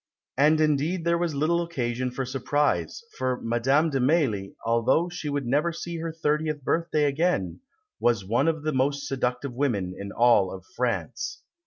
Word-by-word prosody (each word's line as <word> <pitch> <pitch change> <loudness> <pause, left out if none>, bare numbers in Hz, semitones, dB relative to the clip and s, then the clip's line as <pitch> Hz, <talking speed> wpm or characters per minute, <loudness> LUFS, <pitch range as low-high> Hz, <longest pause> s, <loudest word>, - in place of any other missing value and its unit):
And 150 +3 +4
indeed 155 +3 +1
there 170 0 +2
was 170 -4 -1
little 165 +4 +2
occasion 130 -7 -2
for 130 +1 -4
surprise; 135 - -1 0.2
for 130 -1 0
Madame 135 +7 +2
de 135 - 0
Mailly, 125 - +1
although 115 +9 +2
she 175 -4 -5
would 140 -2 -2
never 145 +7 +1
see 170 +1 -5
her 165 0 -3
thirtieth 150 -2 -1
birthday 165 0 +1
again, 140 - 0 0.4
was 115 -5 +1
one 115 +10 +1
of 160 -2 0
the 155 0 -1
most 140 +2 0
seductive 125 -1 -2
women 115 -9 -1
in 100 0 -7
all 100 -6 +3 0.2
France. 455 - -2
140 Hz, 160 wpm, -26 LUFS, 120-160 Hz, 0.4 s, And